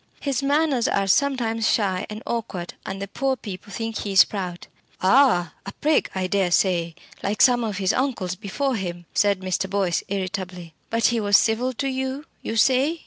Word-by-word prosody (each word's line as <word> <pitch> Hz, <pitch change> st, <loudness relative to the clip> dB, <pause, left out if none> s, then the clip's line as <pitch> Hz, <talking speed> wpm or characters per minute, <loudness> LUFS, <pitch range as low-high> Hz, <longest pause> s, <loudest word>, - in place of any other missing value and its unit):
His 275 Hz, -3 st, -1 dB
manners 280 Hz, -3 st, +2 dB
are 195 Hz, -, +1 dB
sometimes 230 Hz, -1 st, +1 dB
shy 195 Hz, -3 st, 0 dB
and 215 Hz, +1 st, -7 dB
awkward, 195 Hz, -7 st, -4 dB
and 190 Hz, 0 st, -4 dB
the 200 Hz, -, -4 dB
poor 265 Hz, +6 st, -1 dB
people 200 Hz, -3 st, -9 dB
think 225 Hz, +1 st, -4 dB
he's 195 Hz, -2 st, +5 dB
proud." 180 Hz, -4 st, -5 dB, 0.3 s
"Ah! 190 Hz, -4 st, +4 dB
a 195 Hz, -, -8 dB
prig 305 Hz, +1 st, +1 dB
I 190 Hz, -1 st, -1 dB
dare 190 Hz, -1 st, +1 dB
say 175 Hz, -2 st, +1 dB, 0.3 s
like 200 Hz, +1 st, -2 dB
some 245 Hz, -2 st, +5 dB
of 210 Hz, -4 st, -3 dB
his 190 Hz, -1 st, +1 dB
uncles 245 Hz, -9 st, -1 dB
before 230 Hz, +7 st, -2 dB
him," 175 Hz, -3 st, -5 dB
said 200 Hz, -2 st, +2 dB
Mr. 185 Hz, +1 st, -2 dB
Boyce, 190 Hz, -3 st, 0 dB
irritably. 185 Hz, -3 st, -4 dB, 0.2 s
"But 230 Hz, 0 st, 0 dB
he 235 Hz, -, +1 dB
was 205 Hz, -2 st, +5 dB
civil 235 Hz, +3 st, +1 dB
to 275 Hz, +3 st, -2 dB
you, 265 Hz, +2 st, -3 dB, 0.2 s
you 225 Hz, -, -4 dB
say?" 265 Hz, +8 st, +3 dB
205 Hz, 180 wpm, -23 LUFS, 185-255 Hz, 0.3 s, he's